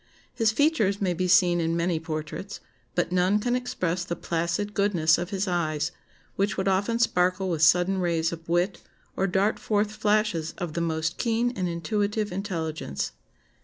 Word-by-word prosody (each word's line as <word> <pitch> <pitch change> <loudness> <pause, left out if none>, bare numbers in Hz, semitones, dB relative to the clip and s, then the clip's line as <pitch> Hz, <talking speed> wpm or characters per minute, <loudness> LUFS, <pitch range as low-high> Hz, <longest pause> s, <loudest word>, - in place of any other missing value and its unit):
His 225 -3 +2
features 220 -7 +2
may 185 -3 +1
be 185 +2 -1
seen 175 -2 +4
in 165 +1 0
many 170 -1 0
portraits; 160 +5 -5 0.4
but 175 - 0
none 185 +3 +3
can 245 +4 0
express 185 -8 -2
the 170 - -3
placid 170 +6 -2
goodness 175 -6 +3
of 175 0 -3
his 195 0 -2
eyes, 155 -4 -1 0.4
which 200 0 0
would 190 0 -1
often 200 +4 +1
sparkle 185 -4 +1
with 160 -3 -1
sudden 180 +4 +4
rays 170 -2 +1
of 165 0 -9
wit, 175 +3 +1 0.3
or 195 - +1
dart 195 +3 +1
forth 210 0 0
flashes 210 -6 0
of 175 -4 -4
the 170 - -1
most 160 0 -1
keen 235 +1 +1
and 185 -2 -1
intuitive 205 +5 -1
intelligence. 165 - -3
185 Hz, 165 wpm, -26 LUFS, 170-205 Hz, 0.4 s, seen